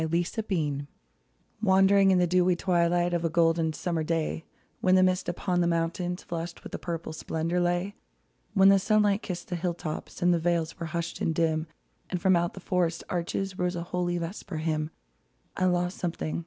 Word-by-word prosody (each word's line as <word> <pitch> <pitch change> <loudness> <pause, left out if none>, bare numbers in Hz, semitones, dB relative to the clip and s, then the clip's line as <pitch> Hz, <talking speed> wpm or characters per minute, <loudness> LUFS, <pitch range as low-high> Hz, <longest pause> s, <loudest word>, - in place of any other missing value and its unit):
WHAT 160 +1 0
I - - +5 0.3
LOST 150 -8 -1 0.8
Wandering 195 -1 +5
in 190 - +5
the 180 - +4
dewy 180 +1 +3
twilight 175 -1 +1
Of 170 -1 0
a 165 - +1
golden 165 0 +2
summer 170 0 -2
day, 160 0 -2 0.3
When 185 0 +4
the 185 - +6
mists 185 0 +1
upon 175 +1 0
the 170 - +2
mountains 170 +2 -1
Flushed 170 0 -5
with - - -9
purple 170 -2 -4
splendor 165 +2 -2
lay: 175 +3 0 0.6
When 195 0 +7
the 195 0 +6
sunlight 210 +1 +2
kissed 180 -2 -6
the 180 - -2
hilltops 170 -2 -4
And 175 0 +5
the 170 - +2
vales 165 -1 -1
were 165 - -3
hushed 170 +1 -4
and 160 - 0
dim, 160 -1 +1 0.4
And 180 - -2
from 185 +1 +4
out 170 0 0
the - - -7
forest 175 -2 0
arches 185 +2 -2
Rose 180 0 0
a 170 - -3
holy 175 0 -1
vesper 170 +1 -5
hymn 155 -1 -1 0.3
— - - -42
I 185 - +1
lost 180 0 0
something. 170 -3 -2
175 Hz, 190 wpm, -28 LUFS, 165-185 Hz, 0.8 s, When